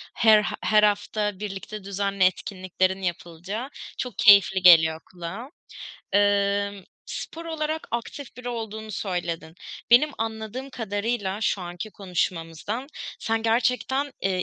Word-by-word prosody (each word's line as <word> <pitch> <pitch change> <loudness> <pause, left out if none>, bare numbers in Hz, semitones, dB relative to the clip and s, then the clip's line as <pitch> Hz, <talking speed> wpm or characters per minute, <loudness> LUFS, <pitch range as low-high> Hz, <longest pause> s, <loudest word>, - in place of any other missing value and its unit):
her 220 -2 +6
eee, 210 - -2 0.2
her 215 -1 +4
hafta 205 -1 +1
birlikte 205 0 -6
düzenli 200 0 -1
etkinliklerin 185 0 0
yapılacağı, 175 +7 -4 0.3
çok 250 - -5
keyifli 200 -3 +6
geliyor 160 -3 +7
kulağa. 185 +8 -7 0.6
Emm, 200 -1 +2 0.2
spor 330 +1 -6
olarak 315 -1 -3
aktif 240 +3 -5
biri 250 0 -6
olduğunu 220 -2 -5
söyledin. 175 -5 -3 0.4
Benim 255 +6 +6
anladığım 225 +4 -4
kadarıyla 205 -3 -2
şu 210 -2 0
anki 175 +4 -6
konuşmamızdan, 180 - -3 0.3
sen 225 0 -1
gerçekten, 250 +4 +1
eee, 185 -1 0
205 Hz, 115 wpm, -25 LUFS, 185-230 Hz, 0.6 s, geliyor